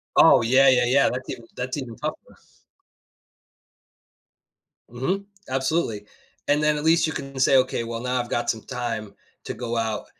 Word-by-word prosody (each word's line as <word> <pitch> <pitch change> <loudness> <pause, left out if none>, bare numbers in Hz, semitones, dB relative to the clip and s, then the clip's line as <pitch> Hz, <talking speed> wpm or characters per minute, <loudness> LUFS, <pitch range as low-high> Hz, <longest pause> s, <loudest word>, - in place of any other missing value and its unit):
Oh, - - +7
yeah, 130 +4 +5
yeah, 130 -1 +4
yeah, 135 +3 +4
that's 130 +1 -5
even 115 - -7
that's 125 +3 -4
even 125 -5 -6
tougher. - - -6 2.5
Mhm. 180 +12 -2 0.2
Absolutely. 130 -5 -1 0.4
And 145 +1 +2
then 150 0 +2
at 150 - -4
least 165 +1 +4
you 155 - -3
can 135 -1 -6
say, 135 +1 +5
"Okay, 130 -2 +1
well, 115 0 -5
now 125 0 -1
I've 120 -1 -4
got 120 - -1
some 110 - -1
time 115 -5 -5 0.3
to - - -4
go 120 -1 -4
out, 110 -2 -2
130 Hz, 165 wpm, -24 LUFS, 115-135 Hz, 2.5 s, Oh